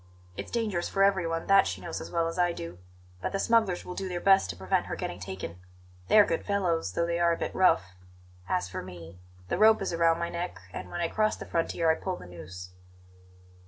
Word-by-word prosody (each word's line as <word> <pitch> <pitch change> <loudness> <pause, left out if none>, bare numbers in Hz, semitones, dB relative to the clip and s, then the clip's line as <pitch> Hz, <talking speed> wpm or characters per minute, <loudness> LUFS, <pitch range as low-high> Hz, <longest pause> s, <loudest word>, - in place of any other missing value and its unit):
It's - - -6
dangerous 215 -7 -1
for 195 - +2
everyone; 170 -4 +1
that 195 0 +5
she - - -3
knows 170 - -5
as - - -7
well 165 -1 0
as 165 +2 -4
I 175 -1 +3
do; 85 - -7 0.4
but - - -3
the 195 - 0
smugglers 220 -5 +2
will 180 - -6
do 190 +1 -4
their 175 -1 -3
best 190 - +4
to 90 - -4
prevent 95 +1 0
her - - -3
getting 85 - -5
taken. 95 -2 -6 0.5
They - - +5
are 210 - +9
good 165 - -1
fellows, 175 - 0
though 170 - +1
they 170 0 -1
are 170 0 +4
a - - -3
bit - - -3
rough. 180 - +4 0.6
As 90 0 0
for 90 - -5
me, 90 -1 -10 0.3
the - - -1
rope 220 0 +7
is 195 -3 -2
round 165 0 +3
my 170 0 -2
neck, 175 +1 -4 0.2
and - - -6
when 175 - -4
I 170 - +2
cross 215 +4 +1
the - - -8
frontier 165 0 +1
I - - +4
pull 185 +3 -3
the - - -11
noose." 90 +1 -10
170 Hz, 235 wpm, -28 LUFS, -, 0.6 s, are